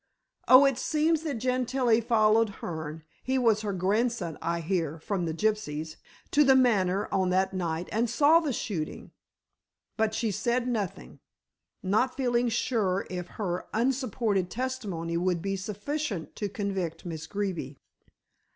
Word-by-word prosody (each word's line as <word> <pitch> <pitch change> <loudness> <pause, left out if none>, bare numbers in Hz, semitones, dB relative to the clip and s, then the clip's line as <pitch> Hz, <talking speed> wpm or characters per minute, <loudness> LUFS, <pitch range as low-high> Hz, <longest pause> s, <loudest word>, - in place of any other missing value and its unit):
"Oh, 255 +2 +9
it 270 -2 +2
seems 315 +1 +1
that 310 -4 -3
Gentilla 250 -1 +1
followed 225 -1 +3
Hearne 160 -1 -5 0.2
he 260 +1 0
was 225 -4 +3
her 210 -2 -2
grandson 195 -1 0
I 170 +1 -1
hear 165 -2 -1
from 180 +2 -2
the 165 - -1
gypsies 160 -7 -2 0.3
to 295 - +5
The 265 -1 +6
Manor 205 -7 +3
on 190 -1 +1
that 190 +1 +1
night 170 -2 -2
and 230 +2 +1
saw 295 +7 +5
the 310 -4 -2
shooting. 180 -9 -4 0.9
But 220 0 +1
she 225 -2 0
said 240 +5 0
nothing, 200 - -4 0.6
not 220 +8 +1
feeling 245 -2 +1
sure 215 -5 0
if 180 -1 -4
her 180 -4 -3
unsupported 230 -6 0
testimony 205 -10 -3
would 180 0 +1
be 195 +3 -2
sufficient 210 - -4
to 205 - -2
convict 195 -5 -3
Miss 160 -2 -6
Greeby. 180 -9 -3
210 Hz, 140 wpm, -28 LUFS, 180-245 Hz, 0.9 s, Oh